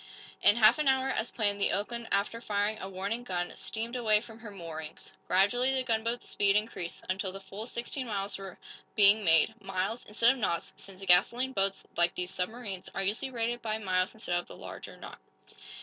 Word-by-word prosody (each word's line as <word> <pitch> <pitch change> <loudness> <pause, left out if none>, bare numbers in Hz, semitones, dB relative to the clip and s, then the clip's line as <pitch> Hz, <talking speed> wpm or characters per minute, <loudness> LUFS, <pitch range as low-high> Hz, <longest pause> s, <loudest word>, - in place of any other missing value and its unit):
In 205 - +6
half 225 +5 +6
an 300 - +1
hour, 265 0 +3
as 240 -3 -1
planned, 205 -3 -1
the - - +4
"Oakland," 230 +3 -2
after 205 +3 0
firing 210 0 0
a 190 - -5
warning 200 +5 -3
gun, 175 -6 -2
steamed 230 +2 -4
away 220 -4 +4
from 225 0 -12
her 225 -2 -9
moorings. 160 -5 -8
Gradually 245 +8 +3
the 260 - +1
gunboat's 230 0 -1
speed 200 -1 +2
increased, 210 -5 -2
until 190 0 -1
the 195 - -8
full 195 +3 -8
sixteen 250 +2 -4
miles 200 -2 -2
were 195 -2 -8 0.4
being 210 +1 +6
made 165 -3 +5
miles, 195 +4 -2
instead 230 +3 +4
of 265 - -4
knots, 170 -6 -1
since 195 0 -10
gasoline 235 +9 +4
boats, 195 -2 0
like 175 0 +3
these 180 +1 -2
submarines, 195 0 -4
are 195 - 0
usually 215 +8 -1
rated 240 -1 -2
by 215 -1 -1
miles 185 -3 0
instead 215 -5 -3
of 175 - -8
by - - -10
the - - -15
longer - - -8
"knot." - - -10
210 Hz, 195 wpm, -30 LUFS, 190-235 Hz, 0.4 s, In